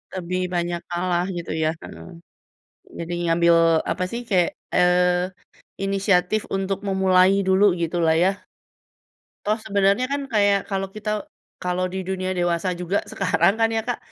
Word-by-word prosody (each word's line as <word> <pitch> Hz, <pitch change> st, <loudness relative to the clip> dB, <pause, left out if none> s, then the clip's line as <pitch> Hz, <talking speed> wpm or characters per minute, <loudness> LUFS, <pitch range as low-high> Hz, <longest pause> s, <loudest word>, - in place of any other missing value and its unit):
Lebih 185 Hz, 0 st, -3 dB
banyak 175 Hz, 0 st, -1 dB
kalah 175 Hz, 0 st, 0 dB
gitu 170 Hz, -, -5 dB
ya, 155 Hz, -, +2 dB
heeh. -, -, -10 dB, 0.9 s
Jadi 170 Hz, +1 st, -5 dB, 0.2 s
ngambil 170 Hz, 0 st, +4 dB, 0.4 s
apa 185 Hz, -, -1 dB
sih, 235 Hz, -, -4 dB
kayak, 180 Hz, -4 st, +2 dB, 0.2 s
eee, 180 Hz, 0 st, +3 dB, 0.6 s
inisiatif 195 Hz, +1 st, +1 dB
untuk 195 Hz, 0 st, -1 dB
memulai 190 Hz, 0 st, +3 dB
dulu 190 Hz, +2 st, +4 dB, 0.2 s
gitu 170 Hz, +1 st, -1 dB
lah 160 Hz, -, +4 dB
ya. 195 Hz, +1 st, 0 dB, 1.1 s
Toh 215 Hz, +2 st, +1 dB
sebenarnya 200 Hz, +4 st, +2 dB
kan 285 Hz, 0 st, -1 dB
kayak 200 Hz, -1 st, +4 dB
kalo 195 Hz, 0 st, -1 dB
kita 215 Hz, 0 st, -4 dB, 0.5 s
kalo 180 Hz, 0 st, -1 dB
di 190 Hz, -, -2 dB
dunia 185 Hz, -1 st, -2 dB
dewasa 175 Hz, +1 st, 0 dB
juga 180 Hz, +3 st, -1 dB
sekarang 195 Hz, 0 st, +2 dB
kan 225 Hz, 0 st, +3 dB
ya 225 Hz, -, +1 dB
Kak, 245 Hz, -, -1 dB
185 Hz, 145 wpm, -23 LUFS, 175-200 Hz, 1.1 s, ngambil